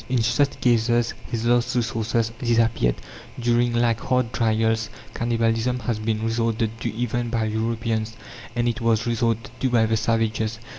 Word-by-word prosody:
In 125 -3 +2
such 140 +5 +1
cases 120 0 +2 0.2
his 115 0 -2
last 120 +1 +2
resources 115 -1 0
disappeared. 115 - +2 0.4
During 120 0 +2
like 120 -1 +2
hard 125 -2 0
trials, 110 0 +1 0.2
cannibalism 115 +1 0
has 110 -1 -2
been 110 0 -1
resorted 115 -1 0
to 120 - -1
even 120 0 -1
by 115 -2 0
Europeans, 110 0 -2 0.4
and 120 0 +1
it 120 +1 -1
was 115 -1 +2
resorted 115 -1 0
to 130 - +1
by 115 -2 +3
the 110 0 +1
savages. 110 -1 0
115 Hz, 150 wpm, -23 LUFS, 110-120 Hz, 0.4 s, by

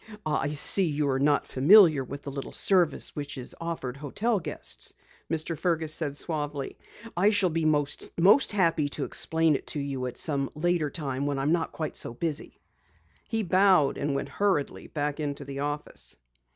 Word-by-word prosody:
"I 150 -1 -1
see 185 +6 +4
you 150 -2 0
are 130 - 0
not 145 +1 +2
familiar 155 0 +6
with 140 +2 -8
the 140 - -6
little 135 0 -6
service 180 -6 +2
which 145 -1 -5
is 125 - -5
offered 160 -7 -4
hotel 205 - -1
guests," 165 - -6 0.3
Mr. 160 +1 -1
Fergus 160 -2 0
said 145 -3 -1
suavely. 145 -3 -3 0.4
"I 190 +4 +4
shall 205 -4 +3
be 165 0 -1
most 155 - +3
happy 165 -7 +2
to - - -3
explain 160 -2 +1
it - - -5
to 150 - -2
you 135 -2 -3
at 125 - -7
some 140 -3 -1
later 170 -1 0
time 140 -2 -3
when 145 -1 -1
I 135 - -2
am 145 - +1
not 165 -1 0
quite 155 -2 -5
so 115 - -2
busy." 155 +2 -3 0.7
He 225 -2 0
bowed 185 -5 +3
and 140 -1 -1
went 140 - -3
hurriedly 190 -3 -1
back 145 0 -3
into 145 -1 -4
the 140 0 -6
office. 145 - -4
150 Hz, 180 wpm, -27 LUFS, 140-170 Hz, 0.7 s, familiar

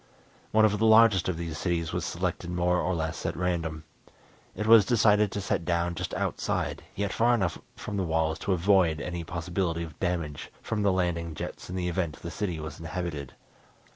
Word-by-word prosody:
One 110 0 +5
of 105 -1 +1
the 110 - +3
largest 110 -4 +6
of 90 - -2
these 80 -2 -5
cities 85 -3 -1
was - - -1
selected 85 - -3
more 90 0 +1
or 90 - 0
less 80 0 -3
at - - -2
random. 85 -3 -2 0.7
It 105 - -3
was 110 -1 +8
decided 105 -2 +3
to 100 - -3
set 95 - -1
down 85 0 0
just - - -4
outside, - - -2
yet 100 0 -2
far 120 +1 +3
enough 95 -7 -1 0.2
from 105 - -5
the 95 - 0
walls 80 -1 0
to 100 - -2
avoid 90 -3 +3
any 85 -1 -4
possibility 85 +1 -2
of 80 -2 -10
damage 85 -5 -3
from 110 -2 -3
the 100 -1 +3
landing 85 -3 -1
jets - - -7
in 90 - -5
the 90 -1 -1
event 85 -3 -2
the - - -5
city 90 -6 -3
was 80 +3 -7
inhabited. 80 -6 -5
90 Hz, 195 wpm, -28 LUFS, 85-100 Hz, 0.7 s, was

